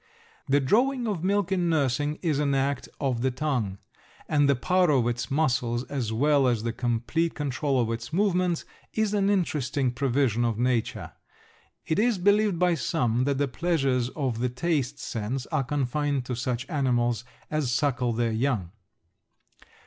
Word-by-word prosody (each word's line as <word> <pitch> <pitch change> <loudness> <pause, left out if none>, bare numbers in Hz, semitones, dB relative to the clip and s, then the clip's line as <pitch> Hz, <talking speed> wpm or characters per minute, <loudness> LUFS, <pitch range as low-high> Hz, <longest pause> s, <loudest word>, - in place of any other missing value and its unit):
The 140 +1 +4
drawing 245 - +2
of 190 -6 -2
milk 200 0 +1
in 180 -3 +1
nursing 145 -1 +1
is 155 -5 +1
an 140 -2 +1
act 135 0 -1
of 130 -5 -1
the 130 - +2
tongue, 125 -7 -2 0.5
and 145 -2 +3
the 140 - +4
power 180 +6 +2
of 130 -5 +3
its 120 +1 -2
muscles 125 -5 +1
as 125 -6 -2
well 140 +3 +3
as 120 -3 +1
the 115 -1 -2
complete 120 +8 -1
control 140 -1 -1
of 115 -2 0
its 115 +3 -5
movements 180 -2 +1 0.3
is 220 -1 +1
an 200 -1 +2
interesting 145 -9 0
provision 125 -2 +1
of 115 -2 0
nature. 120 -1 -1 0.7
It 160 - 0
is 230 -1 +2
believed 205 0 +3
by 180 0 +3
some 125 -4 0
that 140 -1 0
the 145 0 +1
pleasures 135 -4 0
of 130 -6 -2
the 125 +1 0
taste 140 +1 -1
sense 125 0 -4
are 155 -4 +1
confined 140 0 -1
to 125 - -3
such 125 +1 -3
animals 120 -6 0 0.3
as 155 -5 0
suckle 125 -2 +1
their 115 0 0
young. 110 -6 -1
135 Hz, 165 wpm, -26 LUFS, 120-160 Hz, 0.7 s, The